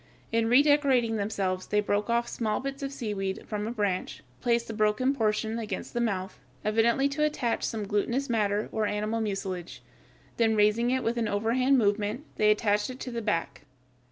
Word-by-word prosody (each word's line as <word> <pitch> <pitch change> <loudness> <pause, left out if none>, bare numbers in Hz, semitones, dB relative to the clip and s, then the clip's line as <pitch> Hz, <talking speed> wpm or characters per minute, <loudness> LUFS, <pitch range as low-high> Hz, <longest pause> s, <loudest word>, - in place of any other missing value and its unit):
In 225 0 +1
redecorating 265 -4 +4
themselves 195 -3 -2
they 210 - +2
broke 205 +1 0
off 235 0 +1
small 215 -3 -1
bits 275 +1 -5
of 275 0 -3
seaweed 205 -6 -3
from 210 0 -3
a - - -2
branch, 200 -9 -2 0.2
placed 235 -1 +1
the 225 - -5
broken 215 +5 +2
portion 220 -2 0
against 210 -4 -5
the 240 - 0
mouth, 195 -5 -2 0.3
evidently 230 +5 +3
to 300 +2 -1
attach 290 -6 0
some 215 -3 -2
glutinous 235 +7 0
matter 210 -2 0
or 215 -1 0
animal 215 +2 -1
mucilage, 185 - -4 0.5
then 225 -1 +3
raising 210 +3 +3
it 260 0 0
with 230 +1 -1
an 230 -2 0
overhand 235 +6 +2
movement, 210 +4 0
they 210 - +4
attached 210 0 +2
it 255 0 -8
to 250 - -5
the 235 -1 -3
back. 205 -6 -2
220 Hz, 180 wpm, -28 LUFS, 210-240 Hz, 0.5 s, redecorating